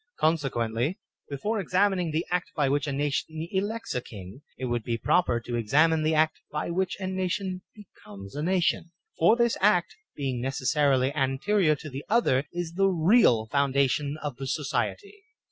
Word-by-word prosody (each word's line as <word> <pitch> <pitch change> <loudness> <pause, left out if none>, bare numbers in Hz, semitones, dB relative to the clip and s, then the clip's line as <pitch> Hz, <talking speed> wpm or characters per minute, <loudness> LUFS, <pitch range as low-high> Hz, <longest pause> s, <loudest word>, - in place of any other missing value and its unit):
Consequently, 135 - 0 0.3
before 205 +11 -2
ex 185 -1 -6
amining 185 -4 +2
the 160 +2 -1
act 180 -1 -1
by 145 -3 +2
which 145 +2 0
a - - -1
nation 145 +3 -2
elects 220 +4 -2
a 125 - -1
king, 100 +2 -11 0.2
it 130 - -4
would 120 -2 -1
be 115 0 -2
proper 120 -2 +2
to 120 +1 -5
examine 155 +8 +3
the 155 +1 +1
act 155 +1 +2
by 150 +3 -3
which 185 +2 -1
a 190 - -4
nation 185 0 -2
becomes 100 - -13
a 145 - -3
nation; 175 0 +1 0.3
for 175 +8 +5
this 235 -1 +1
act, 185 -3 +3 0.2
being 130 -4 -3
necessarily 135 0 +1
anterior 155 +5 +1
to 150 - -10
the 140 0 -6
other, 150 - +2
is 175 -1 -4
the 195 +2 +3
real 175 - +4
foundation 140 +3 +1
of 145 -5 -4
the 135 0 -5
society. 400 - -3
155 Hz, 170 wpm, -27 LUFS, 135-185 Hz, 0.3 s, for